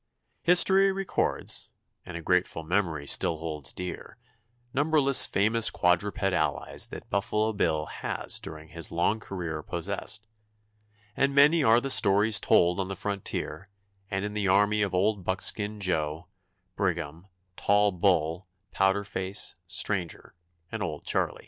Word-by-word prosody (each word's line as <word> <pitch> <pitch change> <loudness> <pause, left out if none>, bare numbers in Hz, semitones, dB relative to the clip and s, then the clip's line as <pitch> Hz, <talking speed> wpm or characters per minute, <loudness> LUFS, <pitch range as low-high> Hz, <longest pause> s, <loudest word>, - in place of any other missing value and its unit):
History 190 +2 +5
records, 195 0 -1 0.4
and 90 -2 -6
a 85 - -8
grateful 90 -2 0
memory 85 -4 -1
still 80 +3 +3
holds 75 -5 -4
dear, 90 0 -7 0.6
numberless 145 -1 +4
famous 110 +3 +2
quadruped 95 +4 0
allies 95 -1 0
that - - -11
Buffalo 105 +3 0
Bill 80 -6 0
has - - -4
during 80 0 -10
his 85 0 -3
long 85 +6 0
career 85 -7 -5
possessed, 110 +7 -5 0.9
and 140 0 +1
many 150 +3 +5
are 115 0 +5
the 135 +2 -1
stories 105 +1 +4
told 90 +2 +3
on 95 - -1
the 95 - -5
frontier 100 0 -5 0.4
and 95 0 -2
in 105 - -5
the 105 -2 -1
army 105 +2 +3
of 100 -3 -1
Old 100 +1 +1
Buckskin 105 +3 0
Joe, 80 -4 -2 0.5
Brigham, 80 +6 -3 0.3
Tall 105 +2 +2
Bull, 90 -2 0 0.2
Powder 95 +1 +1
Face, 95 0 -2
Stranger, 90 -1 -2 0.4
and - - -5
Old - - -5
Charlie. - - -1
95 Hz, 135 wpm, -27 LUFS, 85-105 Hz, 0.9 s, History